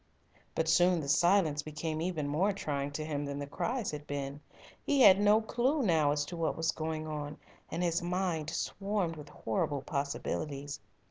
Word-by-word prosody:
But 160 - 0
soon 175 +2 +4
the 145 - -4
silence 160 0 +3
became 155 +1 -4
even 165 -4 -1
more 180 +8 +2
trying 145 -7 -2
to 155 +1 -3
him 145 -2 -2
than 140 0 -4
the 145 - -3
cries 230 - -2
had 150 0 -7
been. 140 0 -4 0.4
He 280 -2 +2
had 195 -4 +9
no 210 +2 +5
clue 255 +6 +1
now 160 -7 +3
as 145 0 0
to 175 - -7
what 165 -1 -1
was 165 +1 +1
going 155 0 -3
on, 150 -1 -5 0.3
and 170 +2 -2
his 170 0 +1
mind 175 -3 -1
swarmed 195 0 -2
with 150 -2 -10
horrible 135 +5 -2
possibilities. 145 0 -3
160 Hz, 180 wpm, -32 LUFS, 145-180 Hz, 0.4 s, had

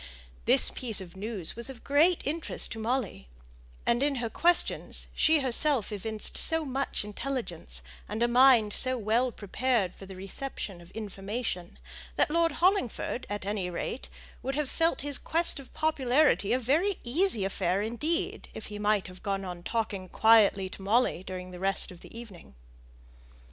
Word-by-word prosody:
This - - +6
piece 230 -5 +2
of 180 -2 -8
news 200 -3 -2
was 235 +2 -4
of 260 -3 -10
great 315 +5 +3
interest 315 +3 -1
to 225 - -5
Molly; 220 - -2 0.6
and, 235 +1 +2
in 285 0 +1
her 235 -3 -3
questions, 350 0 +1
she 315 -1 +3
herself 265 -2 +1
evinced 215 +1 0
so 320 -1 +3
much 270 -3 -2
intelligence, 210 - -4 0.3
and 220 - -1
a - - +4
mind 240 -4 +5
so 255 -1 +2
well 235 +3 +1
prepared 220 -2 -1
for 195 - -12
the 190 - -9
reception 195 -1 -6
of 170 - -15
information, 200 -3 -5 0.4
that 300 - +2
Lord 335 0 +2
Hollingford 340 - 0
at 205 -1 -4
any 200 -3 -2
rate 180 +8 -5 0.3
would 270 +1 -3
have 295 -2 -2
felt 330 0 +1
his 285 -1 +2
quest 330 -2 +1
of 270 - -12
popularity 280 -7 +2
a 245 - +4
very 315 - +1
easy 255 - +1
affair 190 0 0
indeed, 335 - -2
if - - -7
he 205 - -6
might 210 -1 +1
have 185 0 -11
gone 195 -1 -2
on 180 -1 -6
talking 200 -3 -3
quietly 215 -3 +4
to 195 - -10
Molly 210 -1 +2
during 185 -1 -7
the 180 - -9
rest 195 0 +2
of 180 - -12
the 225 - -12
evening. 190 - -12
230 Hz, 165 wpm, -29 LUFS, 195-275 Hz, 0.6 s, This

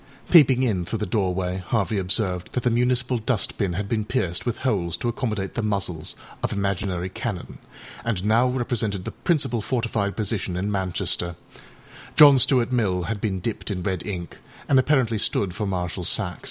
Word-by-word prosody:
â - - -21
Peeping 135 -6 +7
in 100 -8 +1
through 105 +6 -3
the 105 - -2
doorway 90 -2 -1
Harvey 100 +2 -1
observed 90 -1 0
that 125 - -1
the 125 - +2
municipal 125 +1 +1
dust 110 -1 -1
bin 100 -5 0
had 100 +3 -3
been 110 0 0
pierced 95 0 -2
with 120 - -1
holes 85 -9 0
to 120 - -3
accommodate 110 -5 -2
the 120 - -2
muzzles 100 -7 -2 0.3
of - - -1
imaginary 100 -2 -1
cannon, - - -5 0.4
and 105 -5 -2
now 115 +4 +4
represented 115 -6 -1
the - - -4
principal 140 -9 0
fortified 110 -4 -1
position 100 -4 -1
in 100 +3 -1
Manchester; 90 -2 -1 0.8
John 145 -3 +9
Stuart 125 -1 +3
Mill 100 -8 +1
had 105 +2 -3
been 95 -4 -1
dipped 110 +3 -3
in 90 -3 -3
red 95 -2 -2
ink, 90 -4 -6 0.3
and 135 - +5
apparently 130 -5 +2
stood 100 -3 0
for 105 +3 -3
Marshal 90 -1 -3
Saxe. 90 0 0
105 Hz, 180 wpm, -24 LUFS, 95-120 Hz, 0.8 s, John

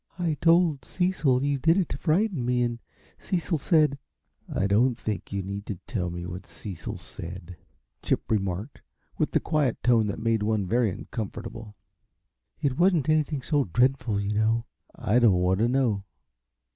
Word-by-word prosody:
"I 175 -3 0
told 165 -5 +4
Cecil 160 -9 +1
you 140 -1 0
did 165 +6 +4
it 185 -5 +2
to - - -4
frighten 175 - +1
me, 125 0 +1
and 120 -1 -2 0.4
Cecil 170 -3 -1
said 150 -2 +3 0.3
" - - -49
"I 95 - 0
don't 115 +5 +3
think 105 -3 -4
you 100 -1 -2
need 100 +2 -6
to 105 - -3
tell 90 -8 -2
me 85 0 -5
what 90 +1 -7
Cecil 95 -7 -6
said," 90 +1 -9 0.5
Chip - - -1
remarked, 100 +3 -2 0.4
with - - +2
the - - +2
quiet 150 -6 0
tone 115 -3 +4
that 100 - -3
made 115 -1 +1
one 105 -1 0
very 115 +3 +2
uncomfortable. 110 +2 -6 0.8
"It 140 0 -1
wasn't 175 -5 +3
anything 150 -3 +1
so 145 -1 +1
dreadful, 120 +1 +1
you 100 +1 -1
know 110 +2 +1 0.2
" - - -33
"I 115 -1 +2
don't 115 -5 +5
want 90 +1 +2
to 115 - +3
know. 120 -6 +1
120 Hz, 170 wpm, -26 LUFS, 100-145 Hz, 0.8 s, don't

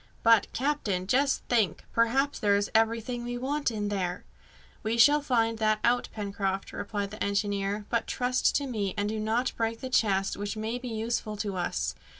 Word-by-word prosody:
"But, 230 -3 +5
captain, 240 -10 -1
just 270 +7 +2
think! 220 -9 +1
Perhaps 265 +5 +2
there 205 -1 +3
is 200 0 0
everything 230 +2 +1
we 245 0 -4
want 280 +3 -1
in 210 -3 -2
there!" 185 -3 -2 0.6
"We 220 +2 -1
shall 290 +5 +6
find 230 -5 +1
that 215 -1 +3
out, 245 +1 +2
Pencroft," 195 -2 -3
replied 200 -1 -3
the 215 - -4
engineer; 200 0 -1
"but 235 -1 0
trust 250 0 +1
to 285 - +1
me, 210 -7 -2
and 205 0 0
do 215 +1 -2
not 225 +4 0
break 225 0 -1
the 260 -1 -6
chest, 195 -5 +2
which 205 +2 -4
may 220 +3 -3
be 250 - -7
useful 220 -1 -2
to 205 -2 -3
us. 65 - -1
220 Hz, 180 wpm, -28 LUFS, 205-245 Hz, 0.6 s, shall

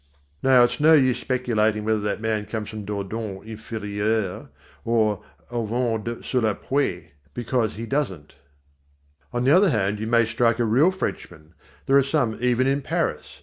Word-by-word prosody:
Now 130 -2 +6
it's 120 0 0
no 155 +2 +6
use 130 -5 +4
speculating 110 -4 0
whether 110 0 +1
that 105 +1 -3
man 110 -2 -1
comes 110 -2 -4
from 110 -2 -7
Dordogne 100 0 -5
Inférieure 110 -2 -3 0.3
or 110 -3 +1 0.3
from 120 - -10
Auvergne 115 0 -2
sur 130 - 0
les 110 -2 +1
Puits 90 - -2 0.3
because 120 -2 -1
he 115 +2 -5
doesn't. 115 - -3 1.0
On 120 0 -1
the 135 - +3
other 190 +1 +5
hand, 105 -5 0
you 110 - -3
may 115 0 +4
strike 115 +1 +1
a 120 - +1
real 130 +10 +4
Frenchman 85 - -6 0.3
there 135 - +4
are - - +6
some 135 -5 0
even 125 +1 +2
in 135 +1 +1
Paris. - - -3
115 Hz, 165 wpm, -24 LUFS, 105-125 Hz, 1.0 s, Now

